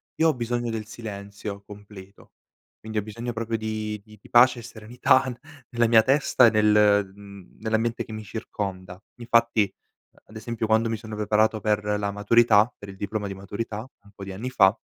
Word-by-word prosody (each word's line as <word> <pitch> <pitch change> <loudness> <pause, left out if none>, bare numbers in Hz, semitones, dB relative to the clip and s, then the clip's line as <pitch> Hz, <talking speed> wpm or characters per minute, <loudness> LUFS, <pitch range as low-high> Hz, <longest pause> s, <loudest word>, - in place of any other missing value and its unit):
io 160 0 +3
ho - - +2
bisogno 120 -1 -2
del 110 -1 -5
silenzio 100 -2 -7
completo, 100 -1 -14 0.5
quindi 110 0 -7
ho 105 - 0
bisogno 115 +3 -6
proprio 115 0 -3
di 110 -1 -4
di 105 -1 -17
di - - -18
pace 120 +1 +6
e - - -8
serenità 120 +4 +1 0.5
nella 120 -1 +1
mia 115 -1 +6
testa 130 0 +4
e - - +6
nel 105 -2 +3
mhmm, 100 -2 -14
nell'ambiente 110 +1 -1
che - - -12
mi 110 0 -6
circonda, 95 -3 -6 0.2
infatti 115 -3 +2 0.6
ad 110 - -16
esempio 115 +1 -4
quando 110 +1 +2
mi 115 - -1
sono 110 -1 -8
preparato 110 +1 +1
per 105 -1 0 0.2
la 100 - -1
maturità 110 +2 +4
per 100 - -11
il 95 - -9
diploma 105 +1 -4
di 100 - -5
maturità 100 +3 -5 0.2
un 100 - -19
po' 100 - -9
di 95 - -7
anni 115 +7 -5
fa 95 -5 +4
110 Hz, 185 wpm, -25 LUFS, 100-115 Hz, 0.6 s, pace